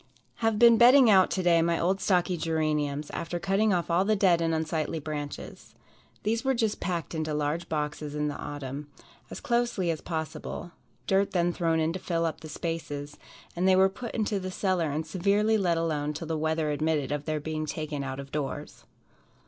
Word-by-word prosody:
Have 225 -2 +1
been 235 0 +7
bedding 250 0 +8
out 190 -2 +6
to 185 - -1
day 170 -2 +4
my 170 0 +1
old 190 +3 +1
stocky 180 -1 +2
geraniums, 155 -3 -1
after 170 +1 -3
cutting 195 +4 +2
off 175 -2 0
all 175 +3 +3
the 215 +2 +2
dead 185 -4 +3
and 165 0 +1
unsightly 160 0 -1
branches. 145 -1 -7 0.5
These 225 +3 0
were 265 -1 +2
just 220 -3 0
packed 175 -3 -3
into 155 -1 -2
large 150 +3 -2
boxes 150 -1 -3
in 150 0 0
the 145 - -3
autumn 145 0 -6 0.4
as - - -7
closely 235 -7 0
as 155 - -4
possible 160 +1 -5 0.3
dirt 195 +1 +1
then 175 -1 +2
thrown 165 -2 +1
in 160 +1 +1
to 185 - -4
fill 170 -2 -1
up 165 - -2
the 155 - -10
spaces, 145 -3 -5 0.4
and 180 +2 +1
they 190 - +6
were 190 +1 +5
put 235 +4 -7
into 210 -2 0
the 185 0 -5
cellar 185 -4 0
and 155 +2 -2
severely 200 +6 +2
let 180 -5 +2
alone 150 -3 -1
till 160 +3 -6
the 160 0 -2
weather 155 0 0
admitted 150 -2 0
of 145 0 -2
their 155 -1 -1
being 155 +1 -4
taken 150 -2 -4
out 135 0 -5
of 140 0 -8
doors. 145 0 -5
165 Hz, 195 wpm, -28 LUFS, 150-190 Hz, 0.5 s, bedding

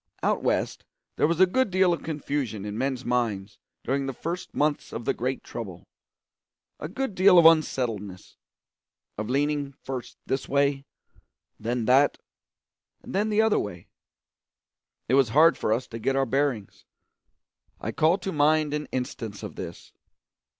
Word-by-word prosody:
Out - - +1
West - - -1 0.3
there - - +3
was 165 +1 -1
a 190 - +8
good 260 +6 +1
deal 185 -1 +3
of 170 - -4
confusion 140 -9 -3
in 105 0 -5
men's 130 +1 -2
minds 110 -5 -1 0.2
during 135 +1 -1
the 135 - -3
first 175 +6 -5
months 150 0 0
of 115 - -6
the - - +2
great 130 +2 -3
trouble 95 -7 -7 1.0
a 150 - -4
good 265 +3 -3
deal 185 0 +6
of 170 - +7
unsettledness, 115 - +2 0.8
of 105 +1 -3
leaning 145 +1 0
first 130 -2 -6
this 135 - -2
way, 140 0 +1 0.7
then 120 +1 -2
that, 135 +4 +4 0.9
then 210 +3 -1
the 215 +1 +3
other 220 -1 +3
way. 90 -4 -6 1.2
It 125 - 0
was 135 -3 +4
hard 160 +7 +6
for - - -2
us 115 +4 +1
to 115 - -6
get 135 +4 0
our 135 0 +2
bearings. 135 -5 -1 1.0
I - - -3
call 160 +4 +3
to 195 0 -4
mind 150 0 +2
an 150 0 -3
instance 115 -5 -4
of - - -6
this. - - -8
135 Hz, 155 wpm, -26 LUFS, 120-160 Hz, 1.2 s, a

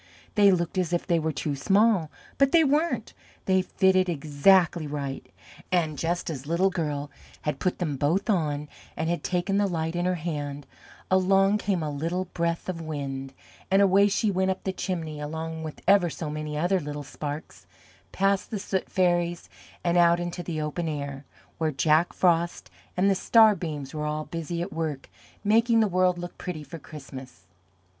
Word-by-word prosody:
They 205 -1 +6
looked 175 0 0
as 180 -1 -1
if 175 - 0
they 170 -2 +2
were 160 0 -1
too 145 0 -3
small, 195 +2 +3 0.3
but 275 -1 +4
they 330 -1 +6
weren't 290 -5 0 0.3
they 190 0 +3
fitted 185 0 +2
exactly 160 +2 +3
right, 140 -2 -4 0.5
and 165 -4 +1
just 170 +4 -2
as 140 -2 -7
Little 180 +4 +2
Girl 150 -5 -3 0.3
had 150 -2 -2
put 185 - 0
them 155 -6 -2
both 160 +9 +1
on 150 -8 0 0.3
and 160 +1 0
had 175 - -2
taken 185 +2 0
the 205 - +2
Light 165 -2 -2
in 175 0 0
her 180 0 +1
hand, 145 -4 -4 0.5
along 195 +2 +4
came 190 -5 -1
a 150 - -2
little 165 +6 -2
Breath 170 -1 -2
of 175 -3 -4
Wind, 135 -4 -5 0.4
and 195 - +4
away 200 0 +5
she 205 +1 +1
went 190 0 +1
up 190 - -2
the 190 - -2
chimney, 165 -5 -4
along 160 +2 -5
with 155 -1 -7
ever 195 -3 +5
so 155 -1 -5
many 150 0 -4
other 180 +4 +2
little 145 -2 -5
Sparks, 145 +2 -7 0.4
past 195 0 +1
the 220 - -3
Soot 195 -1 -3
Fairies, 175 -2 +1 0.3
and 175 0 +2
out 170 0 +5
into 175 0 -4
the 170 -2 -4
Open 155 +3 -2
Air, 140 -2 -4 0.3
where 160 -1 +1
Jack 155 +5 +3
Frost 170 -1 +1 0.3
and 185 +2 +3
the 200 - +5
Star 220 +3 +5
Beams 150 -7 -5
were 150 -1 -3
all 150 0 -2
busy 170 +1 -4
at - - -7
work 155 -4 -4 0.3
making 225 +2 +4
the 220 - +4
world 185 -1 +2
look 175 0 -8
pretty 165 -4 -5
for 165 +2 -9
Christmas. 135 -9 -11
170 Hz, 180 wpm, -26 LUFS, 150-190 Hz, 0.5 s, They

